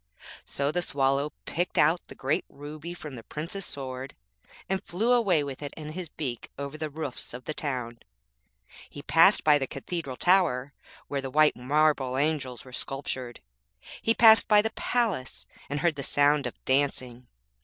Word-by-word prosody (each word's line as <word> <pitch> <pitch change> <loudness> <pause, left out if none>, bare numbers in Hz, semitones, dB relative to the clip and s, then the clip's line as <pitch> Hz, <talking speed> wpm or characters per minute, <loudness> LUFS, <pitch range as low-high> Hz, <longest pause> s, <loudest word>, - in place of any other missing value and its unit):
So 140 +1 -1
the 175 - 0
Swallow 140 -1 0
picked 175 +2 -2
out 160 +4 +3
the - - -11
great 135 +4 0
ruby 150 +4 -8
from 150 -5 -8
the 120 - -8
Prince's 170 - -4
sword, 130 -1 -6 0.5
and 190 0 -1
flew 220 +8 0
away 200 -11 +3
with 140 -1 -6
it 145 -1 -6
in 155 -1 -7
his 175 0 -6
beak 130 -8 -5
over 140 +1 -5
the 155 0 -4
roofs 140 -5 -5
of 125 - -10
the 155 - -3
town. 125 -6 -4 0.9
He 145 - -10
passed 165 +6 +5
by 150 -1 +5
the 135 - -2
cathedral 135 -1 -5
tower, 160 -8 +3 0.3
where 140 -1 -2
the 135 - -5
white 155 +3 +4
marble 135 0 +1
angels 140 -4 -1
were 130 - -13
sculptured. 130 -2 -5 0.6
He 225 - +2
passed 220 -1 +7
by 210 -1 +6
the 220 - -1
palace 220 - -1 0.2
and 145 0 -2
heard 170 0 +3
the - - -3
sound 145 +1 +3
of - - -7
dancing. 130 -3 0
145 Hz, 170 wpm, -27 LUFS, 135-165 Hz, 0.9 s, passed